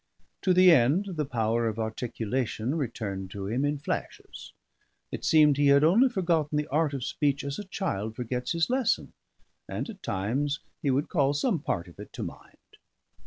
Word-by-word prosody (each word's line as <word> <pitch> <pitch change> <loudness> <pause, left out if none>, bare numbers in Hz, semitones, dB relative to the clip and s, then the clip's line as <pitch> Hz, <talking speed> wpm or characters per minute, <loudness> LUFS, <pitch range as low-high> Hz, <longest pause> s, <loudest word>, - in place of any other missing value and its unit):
To 185 - +2
the 185 0 +7
end, 160 +8 +3
the 155 -6 -3
power 115 -1 0
of 110 -1 -3
articulation 115 +2 -2
returned 110 - -4
to 100 +1 -6
him 120 +7 -1
in 145 +1 0
flashes; 145 - -6 0.6
it - - -5
seemed 150 -3 +5
he 145 0 +3
had 140 +1 +6
only 220 +12 +5
forgotten 170 - 0
the 150 - 0
art 150 -1 +1
of 130 - -4
speech 145 +2 0
as 140 +4 -4
a 205 - -6
child 125 - -3
forgets 125 +4 -3
his 170 0 +1
lesson, 255 -1 0 0.6
and - - -3
at 195 -3 -14
times 130 +10 -1 0.2
he 140 - 0
would 135 +3 +1
call 140 -4 +1
some 185 - +1
part 125 - -3
of 85 - -16
it - - -9
to - - -5
mind. - - -10
140 Hz, 180 wpm, -28 LUFS, 115-165 Hz, 0.6 s, the